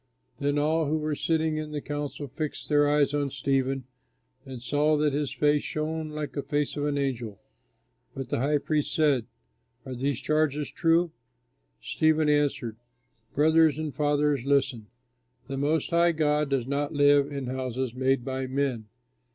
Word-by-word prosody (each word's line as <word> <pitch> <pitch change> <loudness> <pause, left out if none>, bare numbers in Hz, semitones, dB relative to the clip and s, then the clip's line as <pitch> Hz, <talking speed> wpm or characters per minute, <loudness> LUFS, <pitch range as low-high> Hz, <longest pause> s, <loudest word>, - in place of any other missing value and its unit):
Then 145 +1 0
all 155 +1 +1
who 155 +2 +1
were 155 0 -2
sitting 160 +1 0
in 155 0 -4
the 150 - -2
council 145 0 -5
fixed 150 +3 -5
their 145 -1 +4
eyes 145 -1 +2
on 145 -1 0
Stephen 135 0 -1 0.6
and 130 -2 -7
saw 145 +5 +1
that 150 -1 +1
his 145 -2 -1
face 145 +2 +2
shone 155 0 -3
like 150 -1 -4
the 140 - -2
face 145 0 -1
of 145 0 -1
an 145 -1 -1
angel. 120 -7 -3 0.8
But 135 -1 -5
the - - -1
high 145 +4 +2
priest 150 0 -1
said, 145 -7 +2 0.6
"Are 130 - -6
these 135 +1 -1
charges 150 0 0
true?" 165 0 +2 0.7
Stephen 155 -1 +2
answered, 145 -6 0 0.6
"Brothers 160 0 +4
and 155 -2 -3
fathers, 145 -2 +1
listen. 135 -5 +1 0.6
The 135 0 -4
Most 150 +4 0
High 170 0 +4
God 150 -2 +1
does 135 -3 0
not 145 +3 -2
live 145 0 +4
in 140 -2 -4
houses 130 -1 -3
made 130 0 +1
by 130 -1 -3
men. 130 -4 -1
145 Hz, 160 wpm, -27 LUFS, 135-150 Hz, 0.8 s, their